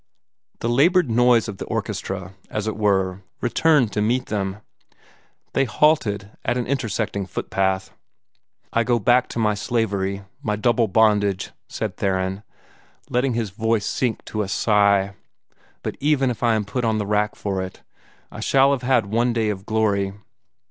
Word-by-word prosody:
The - - -1
labored 150 +4 +3
noise 120 0 +4
of 105 -3 -6
the - - -4
orchestra, 95 -1 -4 0.2
as 105 -1 -3
it 110 - -2
were, 95 -3 +1 0.2
returned 130 -1 +2
to 105 - 0
meet 120 +4 +1
them. 95 -1 -2 1.0
They 135 - +2
halted 110 -6 +1
at 120 +2 0
an 125 - -1
intersecting 110 -6 -2
footpath. 95 0 -1 0.8
"I 115 - +3
go 120 0 +2
back 120 +3 +3
to - - -7
my 110 -2 +2
slavery 100 -3 -1 0.2
my 105 -6 -1
double 115 +1 +2
bondage," 105 -2 +2 0.2
said - - -4
Theron, 95 0 -1 0.7
letting 125 0 +1
his 115 -4 -2
voice 110 +1 0
sink 125 -4 -1
to 110 - -3
a 100 - -2
sigh. 100 -1 +3 0.7
"But - - -4
even 135 -3 +2
if 115 - -7
I 120 -2 +3
am 105 -1 -1
put 125 +5 -3
on 110 -1 +1
the 105 - -1
rack 105 +1 0
for 95 -2 -2
it, 95 0 -8 0.5
I - - -9
shall 135 +1 +4
have 140 -3 0
had 125 -4 +2
one 115 +4 +1
day 110 -2 +1
of 100 -1 -5
glory." 100 -3 +1
110 Hz, 160 wpm, -22 LUFS, 100-120 Hz, 1.0 s, noise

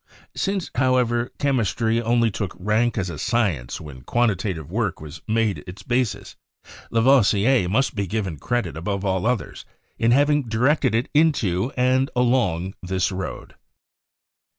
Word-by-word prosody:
Since, 195 -2 -2
however, 125 -2 +1
chemistry 115 - +1
only 115 -1 +2
took 100 -2 -4
rank 110 +5 0
as 95 -3 -1
a 75 - -7
science 100 - -1
when 70 -5 -10
quantitative 95 - -1
work 105 -3 -1
was 75 -1 -10
made 110 -2 0
its 90 +2 -9
basis, 125 -2 -1 0.6
Lavoi 130 +4 +5
sier 105 0 +2
must 130 +7 +1
be 100 -3 -2
given 95 -5 -3
credit 120 - -2
above 100 +4 -3
all 95 +1 0
others 125 -4 -2 0.4
in 115 - +3
having 145 +4 +4
di 110 - -2
rected 130 -1 +2
it 115 +3 0
into 130 - +2
and 130 +1 +2
along 115 -8 +1
this 95 +1 -1
road. 95 0 -6
115 Hz, 145 wpm, -23 LUFS, 95-125 Hz, 0.6 s, Lavoi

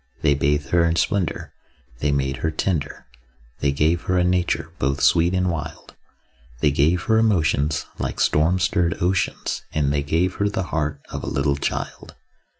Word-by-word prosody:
They 75 -2 +4
bathed 70 0 0
her 85 -1 +3
in 85 0 +2
splendour, 95 0 -1 0.5
They 75 - +1
made 70 -1 -1
her 80 - -1
tender, 80 -2 -2 0.5
They 70 - +1
gave 80 +4 +1
her 90 - +1
a 90 - +3
nature 90 0 0
both 70 +2 0
sweet 85 +5 +3
and 90 -1 +1
wild; 80 0 -7 0.6
They 75 0 +3
gave 80 +5 +2
her 110 0 +3
emotions 80 -8 +1
like - - -3
storm 80 +5 +3
stirred 85 -2 +1
oceans, 95 +2 -1
And 70 -2 +1
they 70 - +1
gave 85 +6 0
her 100 0 +1
the 100 -2 -2
heart 75 -3 -1
of - - -4
a - - -6
little 70 +1 +1
child. 70 - -4
80 Hz, 170 wpm, -22 LUFS, 70-90 Hz, 0.6 s, They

